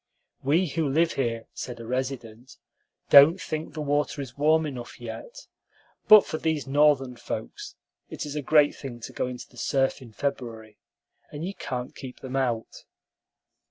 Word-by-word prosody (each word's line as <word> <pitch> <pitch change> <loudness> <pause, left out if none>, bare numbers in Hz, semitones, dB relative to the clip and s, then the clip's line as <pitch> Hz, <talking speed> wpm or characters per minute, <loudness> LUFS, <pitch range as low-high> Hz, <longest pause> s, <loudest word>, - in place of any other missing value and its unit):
"We 155 +7 +2
who 155 0 -1
live 165 +4 +2
here," 115 -4 -2
said 120 -2 -6
a 115 - -8
resident, 125 -1 -5 0.5
"don't 145 +6 +9
think 155 -4 -5
the 155 - -3
water 145 0 0
is 130 -3 -6
warm 155 +2 +3
enough 125 -4 -7
yet; 120 - -8 0.6
but 215 -1 +9
for 155 - -4
these 160 -2 -1
Northern 135 -2 +3
folks - - -6 0.3
it - - -5
is 145 0 -6
a 150 - -1
great 145 +1 +4
thing 125 -4 -8
to - - -8
go - - -1
into 125 -1 -7
the 125 - -20
surf 135 +2 0
in 120 -3 -12
February, 110 -4 -5 0.5
and 150 +3 -5
you 195 - -4
can't 125 -8 -5
keep 130 -2 -9
them 130 0 -6
out." 120 -4 -2
135 Hz, 165 wpm, -26 LUFS, 125-150 Hz, 0.6 s, don't